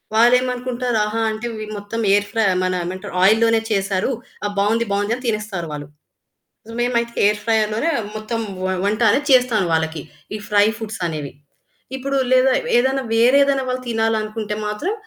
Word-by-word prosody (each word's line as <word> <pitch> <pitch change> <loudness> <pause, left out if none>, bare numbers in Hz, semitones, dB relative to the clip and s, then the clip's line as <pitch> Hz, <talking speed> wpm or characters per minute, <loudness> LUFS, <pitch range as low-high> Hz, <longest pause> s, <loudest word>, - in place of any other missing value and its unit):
వాళ్ళు 240 +2 +6
ఏమనుకుంటారు, 250 -1 -2
ఆహా! 215 +2 -3
అంటే 215 +2 -5
ఇవి 215 0 -5
మొత్తం 205 +3 -5
ఎయిర్ 205 +1 +3
ఫ్రైయే 220 -5 +2
మానా 185 0 0
ఏమంటారు 185 +2 -6
ఆయిల్ 215 +3 +5
లోనే 225 0 +4
చేసారు, 195 +1 0 0.4
ఆ! - - +2
బావుంది, 225 +3 +2
బావుంది 205 +3 0
అని 255 - -11
తినేస్తారు 210 -6 -2
వాళ్ళు. 145 -1 -6 0.9
మేమైతే 235 -1 0
ఎయిర్ 210 0 +2
ఫ్రైయర్ 220 -2 +2
లోనే 290 +10 0 0.3
మొత్తం 215 +2 -3 0.3
వ - - +1 0.2
వంట 215 +3 0
అనేది 290 +7 +1
చేస్తాను 245 -6 +4
వాళ్ళకి. 160 -1 -1 0.3
ఈ - - -3
ఫ్రై 205 0 +5
ఫుడ్సనేవి. 170 -10 -4 0.7
ఇప్పుడు 275 +1 -2 0.2
లేదా, 255 +1 +4 0.2
ఏదైనా 265 +2 +1
వేరే 245 +4 +5
ఏదైనా 275 -2 0
వాళ్ళు 255 0 -3
తినాలనుకుంటే 220 -1 -1
మాత్రం, 295 - -2
220 Hz, 160 wpm, -20 LUFS, 205-245 Hz, 0.9 s, వాళ్ళు